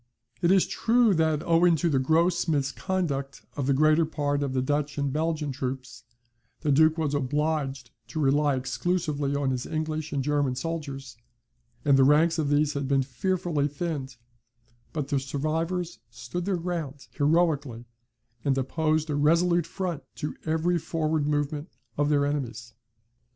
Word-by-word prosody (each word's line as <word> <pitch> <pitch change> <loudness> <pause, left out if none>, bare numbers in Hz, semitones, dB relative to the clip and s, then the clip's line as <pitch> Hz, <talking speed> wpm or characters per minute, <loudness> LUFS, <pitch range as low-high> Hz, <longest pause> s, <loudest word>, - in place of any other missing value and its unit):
It 170 - +3
is 190 -1 +5
true 230 -2 +3
that, 160 -3 +1
owing 170 0 +4
to 165 +2 0
the 140 -5 +2
gross 165 +6 +2
misconduct 140 -1 -2
of 140 -3 -2
the 140 - +4
greater 155 +3 +4
part 145 -2 -1
of 140 -2 -1
the 130 - +1
Dutch 145 +1 -1
and 140 -2 -1
Belgian 155 -1 -1
troops, 130 -2 -5 0.6
the 150 - +1
Duke 155 +3 +5
was 155 -3 -1
obliged 140 -2 -1 0.2
to 155 - -5
rely 145 0 +3
exclusively 140 +3 -1
on 140 -2 0
his 130 0 -3
English 155 0 -3
and 140 -2 -1
German 145 -2 +1
soldiers, 140 -4 -5 0.7
and 140 -2 +5
the - - +7
ranks 160 +4 +4
of 150 -2 0
these 145 +1 +2
had 140 -1 -2
been 135 -1 +2
fearfully 150 +2 -1
thinned; 140 -4 -4 0.7
but 150 -4 -3
the 140 - +1
survivors 160 +6 -2
stood 175 0 -5
their 195 -2 0
ground 165 -6 -4
heroically, 145 -6 +1 0.6
and 135 -2 +1
opposed 155 +3 0
a - - 0
resolute 170 +3 +3
front 175 -4 -3
to 150 - -4
every 165 +2 +1
forward 155 -2 -1
movement 150 +2 -1 0.3
of 145 0 +1
their 145 -1 +3
enemies. 120 -5 -3
150 Hz, 155 wpm, -27 LUFS, 140-165 Hz, 0.7 s, the